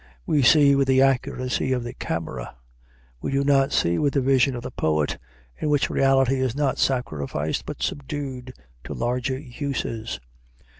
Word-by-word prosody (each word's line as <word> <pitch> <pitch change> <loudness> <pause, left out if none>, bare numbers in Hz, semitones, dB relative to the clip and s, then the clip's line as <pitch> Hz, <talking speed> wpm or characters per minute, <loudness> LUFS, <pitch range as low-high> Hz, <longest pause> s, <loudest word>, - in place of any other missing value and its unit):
We 150 - +2
see 140 +2 +6
with 135 -1 +2
the 130 0 +5
accuracy 130 0 0
of 125 -2 -1
the 120 - -6
camera; 65 -8 -5 0.7
we - - -3
do 140 0 +2
not 135 -1 +3
see 85 0 +1
with 145 -1 +1
the 140 - +3
vision 130 0 +3
of 120 - -6
the - - -6
poet, 75 -2 0 0.4
in 150 - -1
which 145 -2 +2
reality 135 -1 +3
is 130 -2 0
not 145 -2 0
sacrificed, 75 - -1
but - - -5
subdued 135 -3 -4 0.3
to - - -6
larger 125 +2 -1
uses. 130 -4 -4
130 Hz, 160 wpm, -24 LUFS, 120-140 Hz, 0.7 s, see